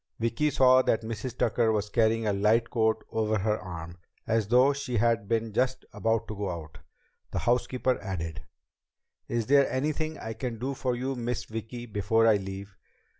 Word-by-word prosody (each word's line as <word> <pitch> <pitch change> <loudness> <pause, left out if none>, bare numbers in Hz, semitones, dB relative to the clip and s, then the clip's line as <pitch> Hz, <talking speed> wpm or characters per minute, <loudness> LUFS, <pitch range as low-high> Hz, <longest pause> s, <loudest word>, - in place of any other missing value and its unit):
Vicki 115 +6 +1
saw 130 -2 +5
that 115 -3 +1
Mrs. 115 +2 -5
Tucker 115 -2 +2
was 105 -1 -1
carrying 115 0 +2
a 105 - +1
light 110 +4 +2
coat 110 -2 +1
over 110 -1 +1
her 105 +2 0
arm, 85 -1 -8 0.3
as 110 -2 +1
though 125 +5 +5
she 125 -3 -3
had 115 -1 +2
been 115 -1 -1
just 130 +3 0
about 115 0 0
to 110 - -5
go 100 -1 -3
out. 80 -3 -7 0.5
The - - -4
housekeeper 125 +1 +1
added: 80 -5 -4 0.9
"Is 115 -2 -1
there 140 +2 +4
anything 155 +3 -1
I 110 - -5
can 120 -1 -4
do 130 +5 -3
for 130 -2 -1
you, 130 +2 -2
Miss 120 0 -3
Vicki, 115 +2 -6
before 110 +1 +1
I 110 -2 +5
leave?" 95 0 -7
115 Hz, 175 wpm, -28 LUFS, 105-125 Hz, 0.9 s, saw